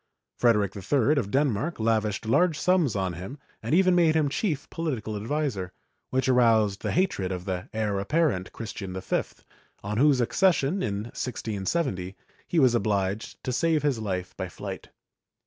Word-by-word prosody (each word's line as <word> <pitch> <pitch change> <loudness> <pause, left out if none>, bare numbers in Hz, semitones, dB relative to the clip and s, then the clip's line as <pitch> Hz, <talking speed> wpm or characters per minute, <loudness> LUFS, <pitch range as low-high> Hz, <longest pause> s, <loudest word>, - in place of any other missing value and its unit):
Frederic 105 -5 +2
III 125 +7 +1
of 110 -8 0
Denmark 135 +3 0
lavished 110 -2 0
large 160 +8 +3
sums 175 - +2
on 95 -2 -1
him 95 - -7 0.2
and - - 0
even 185 0 +5
made 170 -3 +4
him 155 -3 +2
chief 145 0 -2
political 125 -10 -3
adviser, 110 -5 -2 0.4
which 130 +1 0
aroused 115 -6 +3
the - - -2
hatred 155 - 0
of 90 -1 -4
the 95 -2 -4
heir 105 -3 -1
apparent, 115 - 0
Christian 100 -4 -6
V, - - 0 0.6
on 105 +2 -3
whose 140 0 +4
accession, 155 - +2
in 100 -3 -2
1670, 100 - -2 0.3
he 175 - -2
was 130 -6 +5
obliged 100 -2 -1
to 130 - -2
save 155 +3 +1
his 140 -6 +1
life 95 -4 -3
by - - -4
flight. - - -7
115 Hz, 155 wpm, -26 LUFS, 100-150 Hz, 0.6 s, even